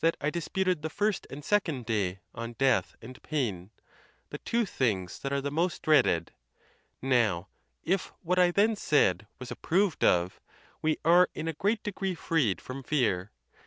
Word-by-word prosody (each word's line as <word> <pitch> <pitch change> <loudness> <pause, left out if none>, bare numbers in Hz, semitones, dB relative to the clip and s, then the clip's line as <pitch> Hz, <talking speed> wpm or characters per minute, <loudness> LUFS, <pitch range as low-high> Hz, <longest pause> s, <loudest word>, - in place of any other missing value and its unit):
I 150 - -1
disputed 180 +1 -1
the 160 - -3
first 205 +4 -1
and 145 +1 -9
second 165 - 0
day 100 -5 -1
on 115 0 -6
death 135 +2 +1
and 130 +3 -11
pain—the 110 - -6
two 235 0 0
things 105 - -1
that 135 - -4
are 140 0 0
the 140 +1 -3
most 170 +3 -1
dreaded: 85 - +3 0.7
now, 110 -9 +1 0.3
if 190 +2 0
what 180 +2 +1
I 180 -1 +6
then 210 +5 +3
said 115 - +2
was 125 -2 -8
ap 125 - -8
proved 185 -1 +1
of, 90 +1 +2 0.4
we 155 0 +1
are 175 +2 +6
in 155 - -4
a 165 - -1
great 205 +7 0
degree 195 -2 -3
freed 145 - 0
from 130 +1 -7
fear. 115 -10 0
145 Hz, 160 wpm, -29 LUFS, 115-180 Hz, 0.7 s, I